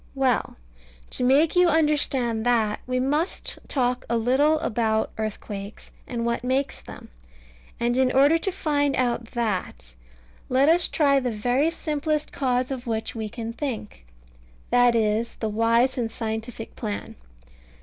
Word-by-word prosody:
Well, 265 -3 +1 0.6
to - - 0
make 285 +7 +4
you 360 0 +5
understand 285 -7 +1
that, 220 -3 +2
we 255 0 0
must 295 +7 -1
talk 250 -2 0
a 235 - +1
little 270 +7 +3
about 220 -1 0
earthquakes, 210 -1 -6 0.2
and 235 -2 -3
what 235 0 -1
makes 265 +2 -1
them; - - -11 0.7
and 240 +1 +1
in 260 0 +3
order 285 +5 +4
to 390 - -1
find 290 -6 0
out 240 -2 0
that, 185 - -3 0.6
let 270 +4 +4
us 340 +1 +4
try 280 -3 +3
the 250 -2 -2
very 245 +7 +1
simplest 305 -2 -2
cause 255 -1 0
of 250 -2 -5
which 225 -1 -2
we 220 -2 -4
can 230 0 -6
think. 220 - -6 0.6
That 245 -1 +5
is 225 +1 0
the 220 - -3
wise 230 +4 +2
and 225 -2 -2
scientific 225 0 -5
plan. 210 -3 -5
245 Hz, 145 wpm, -24 LUFS, 225-280 Hz, 0.7 s, you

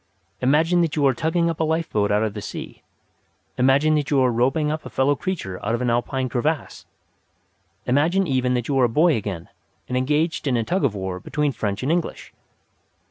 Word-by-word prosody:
Imagine 160 +7 +3
that 165 -3 0
you 145 -2 +2
are 135 - +4
tugging 165 +6 0
up 165 -2 -2
a - - +2
lifeboat 160 -10 0
out 105 +1 +2
of 110 -2 -2
the 105 - -6
sea. - - -8 0.8
Imagine 135 +4 +4
that 150 -2 0
you 140 - +3
are 130 -1 +3
roping 135 +6 +1
up 155 0 -4
a - - -8
fellow 140 +2 +1
creature 145 - -5
out 110 +3 0
of 120 - -4
an 120 - +1
Alpine 130 +2 -1
crevass. 145 +5 -2 1.0
Imagine 165 +9 +2
even 130 -4 +1
that 120 -2 -2
you 135 -2 +1
are 125 - +5
a - - 0
boy 155 +6 +3
again 100 -6 -4 0.4
and 125 - -3
engaged 150 +5 0
in 125 -3 +2
a 115 - 0
tug 180 - -1
of 120 -7 +1
war 95 -2 -4
between 150 +9 -1
French 105 -2 -3
and 140 - 0
English." 170 -1 -3
135 Hz, 205 wpm, -22 LUFS, 120-155 Hz, 1.0 s, are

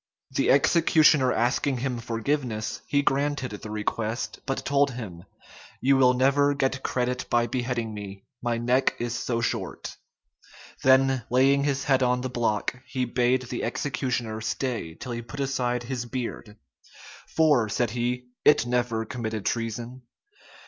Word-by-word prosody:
The - - +1
executioner 150 -2 +5
asking 125 +3 +1
him 125 -1 -2
forgiveness, 115 0 -2
he 145 0 +2
granted 140 -2 0
the 105 +1 -8
request, 110 +2 -3
but 135 - -2
told 140 0 +3
him, 100 -9 -8 0.5
"You 135 +2 +4
will 125 -1 +5
never 140 +2 +3
get 135 -1 0
credit 125 0 -2
by 120 0 +3
beheading 120 -2 -2
me, 100 -2 -8 0.2
my 120 -1 0
neck 125 +3 +2
is 120 0 -3
so 115 0 -1
short." 120 - -3 0.8
Then 130 -1 +4
laying 135 +3 +4
his 140 -1 0
head 135 -1 +2
on 125 0 +2
the 130 - -3
block, 120 0 -1
he 130 0 -1
bade 125 +1 +1
the 120 -1 -5
executioner 125 -3 -2
stay 115 -8 -3
till 125 - -7
he 120 0 -3
put 130 +5 -9
aside 125 -3 -1
his 120 -1 -4
beard: 115 -4 -5 0.8
"For," 145 -9 +4
said 120 +1 0
he, 125 +1 -2
"it 150 - +5
never 120 -2 0
committed 110 -3 -4
treason." 120 +2 -3
125 Hz, 145 wpm, -26 LUFS, 115-135 Hz, 0.8 s, executioner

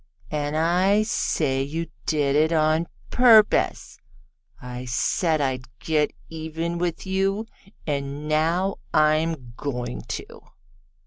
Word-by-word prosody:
"And 150 0 -1
I 185 +6 +3
say 145 - 0
you 160 +5 -3 0.2
did 145 -3 +1
it 155 +2 +3
on 155 +1 +2 0.2
purpose. 230 -4 +4 0.6
I 125 0 -7
said 155 +6 +1
I'd 130 -2 -1
get 150 +1 0 0.2
even 165 +1 -4
with 175 +1 -2
you, 195 +3 0 0.4
and 140 0 -3
now 165 +5 +1 0.2
I'm 155 -5 +2
going 125 - -4
to." - - -7
155 Hz, 110 wpm, -24 LUFS, 140-170 Hz, 0.6 s, purpose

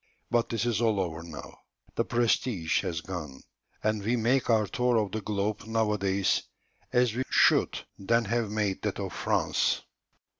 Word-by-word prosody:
But 120 -1 +2
this 115 +1 -1
is 120 -2 0
all 110 -3 +2
over 85 -3 -2
now; 80 -4 -10 0.3
the - - +1
prestige 115 -7 +1
has 85 -4 -3
gone, 80 -7 -7 0.4
and 110 -1 +1
we 115 +5 +1
make 125 +3 +1
our 110 -2 +4
tour 125 +4 +1
of 105 -3 0
the 110 - -3
globe 105 +1 -2
nowadays 105 -4 +1 0.5
as 125 -3 +3
we 125 - -2
should - - +3
then 115 +4 +2
have 115 +1 0
made 105 -2 -1
that - - -2
of - - -4
France." - - +1
110 Hz, 160 wpm, -28 LUFS, 95-115 Hz, 0.5 s, our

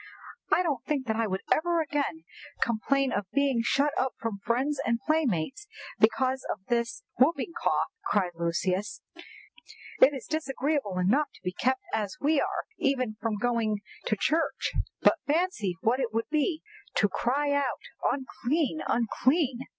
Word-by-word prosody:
'" - - -16
"I 365 - +4
don't 290 -8 -1
think 285 -4 -1
that 220 - 0
I 225 0 +1
will 190 -1 -1
ever 340 +1 +3
again 310 0 -1 0.4
complain 265 +4 +1
of 200 -2 -2
being 280 -4 +2
shut 280 +5 +2
up 260 0 0
from 225 -3 -3
friends 255 +8 0
and 230 0 +1
playmates 310 - 0 0.3
because 260 +4 +3
of - - -2
this 235 -1 0 0.2
whooping 285 +3 +3
cough," - - +1
cried 190 -4 +1
Lucius. 180 +7 -1 1.0
"It 280 - +8
is 270 -4 -6
disagreeable 280 -8 -1
enough 235 +12 +3
to - - -18
be 180 - -1
kept 260 +6 0
as 215 +4 -1
we 290 0 +3
are - - -1 0.2
even 255 -5 +1
from 225 -2 -1
going 220 -2 0 0.3
to 215 - +2
church, 320 +11 0 0.3
but - - +5
fancy 290 - 0
what 240 +4 +2
it 245 -4 -1
would 225 +1 -2
be 310 +1 +1 0.3
to - - +3
have - - +2
to - - -5
cry 285 +4 +1
out 285 -3 +1 0.3
'Unclean! 275 +3 -1
unclean! 255 +3 +1
260 Hz, 160 wpm, -28 LUFS, 220-290 Hz, 1.0 s, It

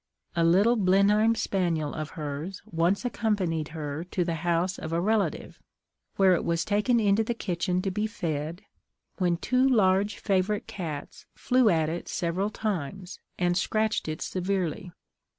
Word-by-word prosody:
A 170 - +2
little 200 +8 +4
Blenheim 205 +3 +4
spaniel 170 -8 -1
of 155 -1 -4
hers 150 +5 -5
once 175 +7 0
accompanied 190 -10 -1
her 155 -1 -5
to 180 0 -1
the 170 - -1
house 175 +2 0
of 160 - -6
a 165 - +1
relative, 210 +3 -1 0.6
where 190 -1 +5
it 170 - 0
was 170 0 0
taken 210 +4 +2
into 210 0 +3
the 235 +2 -2
kitchen 180 -2 -1
to 195 - -1
be 210 +3 -1
fed, 165 -3 -4 0.6
when 175 -2 +2
two 255 +8 +1
large 205 -5 +3
favourite 200 +1 0
cats 160 -7 -7
flew 250 -3 +3
at 160 -4 +2
it 170 +2 -4
several 180 +4 -1
times, 190 -4 -4 0.2
and 175 -1 +1
scratched 215 +2 0
it 155 0 -3
severely. 185 -2 -2
185 Hz, 150 wpm, -27 LUFS, 165-210 Hz, 0.6 s, where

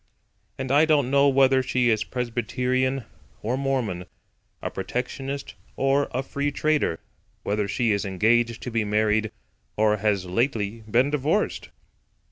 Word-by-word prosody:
And 130 -1 -3
I 145 +3 +5
don't 145 -5 +2
know 140 0 +5
whether 135 -1 +4
she 125 -2 +1
is 110 -1 +1
Presbyterian 125 +2 -1 0.4
or 115 +4 0
Mormon; 130 -10 -1 0.5
a - - -4
Protectionist 135 +6 -4 0.2
or 135 +1 +2
a 130 +2 -2
Free 140 +2 -2
Trader; 150 - 0 0.4
whether 105 0 -1
she 115 +3 +1
is 100 -1 0
engaged 115 +5 +1
to 125 - -5
be 115 -1 +1
married 105 +1 +1 0.5
or 105 0 +3
has 100 -3 0
lately 110 +2 -1
been 125 +5 +3
divorced! 150 +8 0
125 Hz, 135 wpm, -25 LUFS, 110-135 Hz, 0.5 s, I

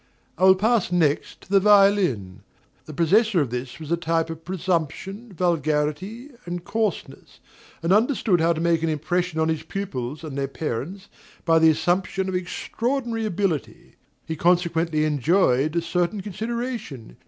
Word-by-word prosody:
I 185 - +2
will 190 0 +8
pass 215 -1 +1
next 160 -5 0
to - - -17
the 200 - +6
violin. 195 - +3 0.5
The 155 - -8
possessor 200 +5 +3
of 140 -6 0
this 125 +4 -5
was 155 0 -8
a - - +4
type 165 -1 -1
of 165 0 -9
presumption, 185 +5 -3
vulgarity, 170 - -1 0.2
and 175 0 -4
coarseness, 220 -1 -3 0.4
and 170 +3 +3
understood 215 - +2
how 170 +1 +3
to 160 - -5
make 170 -1 +2
an 165 - 0
impression 165 +2 -1
on 160 - +2
his 160 -1 -1
pupils 150 -8 -5
and 150 -4 -6
their 140 -1 -1
parents 155 - -5 0.4
by 165 -1 +4
the 160 0 +6
assumption 175 +4 0
of 190 - -3
extraordinary 230 +5 -2
ability. 180 - -3 0.3
He 160 - -4
consequently 170 -2 +1
enjoyed 150 0 +2
a 170 - +1
certain 180 +4 -1
consideration. 215 - -5
170 Hz, 155 wpm, -24 LUFS, 155-195 Hz, 0.5 s, will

